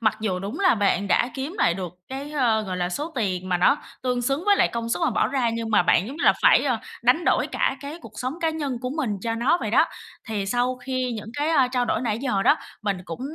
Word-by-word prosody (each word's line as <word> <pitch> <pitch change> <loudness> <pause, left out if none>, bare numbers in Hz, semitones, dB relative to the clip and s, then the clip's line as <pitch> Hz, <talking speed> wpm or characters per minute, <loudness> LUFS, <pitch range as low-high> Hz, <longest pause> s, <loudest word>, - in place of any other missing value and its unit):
Mặc 220 -1 +2
dù 195 -4 -1
đúng 200 +9 -5
là 370 -7 +5
bạn 200 -1 +1
đã 240 - +3
kiếm 280 +7 -4
lại 170 - +3
được 180 -3 -5 0.2
cái, 275 +3 -6
ờ, 235 -7 +2
gọi 185 -3 -4
là, 175 -1 -1
số 295 - -4
tiền 185 -6 -2
mà 180 - +2
nó 230 - +4 0.3
tương 250 -1 0
xứng 275 +7 -1
với 405 -1 +5
lại - - +3
công 230 0 -4
sức 230 - -1
mà - - +2
bỏ - - +2
ra, 255 -4 +1
nhưng 230 0 -3
mà 210 - +4
bạn 175 +2 +3
giống 275 +5 -7
như - - -2
là - - +7
phải, - - +6
a, 250 -5 +1 0.2
đánh 255 +8 +3
đổi - - +2
cả - - 0
cái 290 +4 -7
cuộc - - -11
sống 255 +4 -3
cá 325 - +1
nhân 285 -6 -3
của 250 0 -3
mình 265 -9 -1
cho 230 -1 -1
nó 270 +10 +2
vậy - - -3
đó. - - +4 0.4
Thì 205 -3 -2
sau 245 +3 0
khi 255 -1 -3
những 215 -1 -6
cái, 295 +2 0
a, 275 -6 +3
trao 250 -1 0
đổi 225 - 0
nãy 225 -3 -1
giờ 235 -7 0
đó, - - +5 0.3
mình 200 -3 -1
cũng, 165 +4 -7
245 Hz, 275 wpm, -24 LUFS, 210-275 Hz, 0.4 s, là